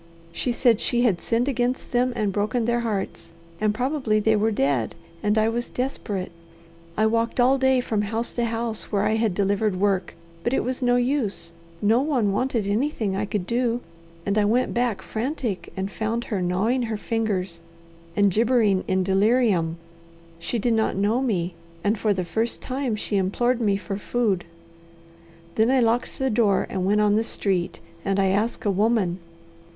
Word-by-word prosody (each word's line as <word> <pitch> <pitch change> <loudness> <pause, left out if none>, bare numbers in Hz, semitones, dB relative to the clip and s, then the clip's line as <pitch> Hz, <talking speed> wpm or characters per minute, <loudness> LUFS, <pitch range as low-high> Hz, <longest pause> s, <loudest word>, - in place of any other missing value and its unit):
She 245 +8 -1
said 240 -2 +3
she 240 0 +2
had 205 -8 +2
sinned 235 +2 0
against 250 -1 -1
them 250 +1 +2
and 210 -4 0
broken 215 +4 0
their 235 +1 +1
hearts, 210 -7 -3 0.3
and 215 -1 +2
probably 250 -1 0
they 220 +1 +3
were 215 +1 +2
dead, 135 - 0 0.3
and 210 +1 +1
I 215 0 +3
was 235 +1 -1
desperate. 210 -8 -3 0.7
I 215 - +3
walked 230 +2 0
all 260 +2 +4
day 265 -1 +3
from 220 -4 -1
house 225 +3 -2
to 240 - 0
house 230 -1 -3
where 200 -1 +1
I 215 +1 +2
had 220 -4 +1
delivered 200 0 +1
work, 195 -2 0 0.3
but 240 - +1
it - - +1
was 255 +1 -3
no 245 -1 +3
use; 245 -9 0 0.3
no 225 +4 +4
one 260 -9 +1
wanted 230 0 0
anything 215 -1 0
I 200 +2 -1
could 205 -3 -2
do, 240 +2 0 0.5
and 200 +1 +1
I - - +3
went 240 +5 +1
back 235 -5 0
frantic, 225 - -3
and 190 +1 -3
found 225 +3 -2
her 195 - 0
gnawing 195 +8 +1
her 220 - -2
fingers 200 -7 -2 0.5
and 205 -1 +4
gibbering 220 -2 +3
in 190 0 +1
delirium. 195 -4 +2 0.6
She 235 - -2
did 230 +2 +1
not 220 -1 +1
know 210 +6 +1
me, 185 -9 -1 0.3
and 210 +2 +2
for 215 0 0
the 185 -3 -1
first 225 +6 -1
time 255 -3 -2
she 205 -1 -2
implored 240 +6 +1
me 200 -3 +2
for 195 +1 -5
food. 205 -5 0 1.1
"Then 220 +2 +3
I 265 0 +4
locked 235 +1 +1
the 265 -1 0
door 210 -3 +2
and 185 -1 -1
went 210 +1 +3
on 210 0 +3
the 220 - +2
street 190 -5 -1 0.2
and 195 0 0
I 195 -1 +3
asked 210 +5 -1
a 205 - +3
woman. 200 -3 +1
220 Hz, 180 wpm, -24 LUFS, 195-240 Hz, 1.1 s, all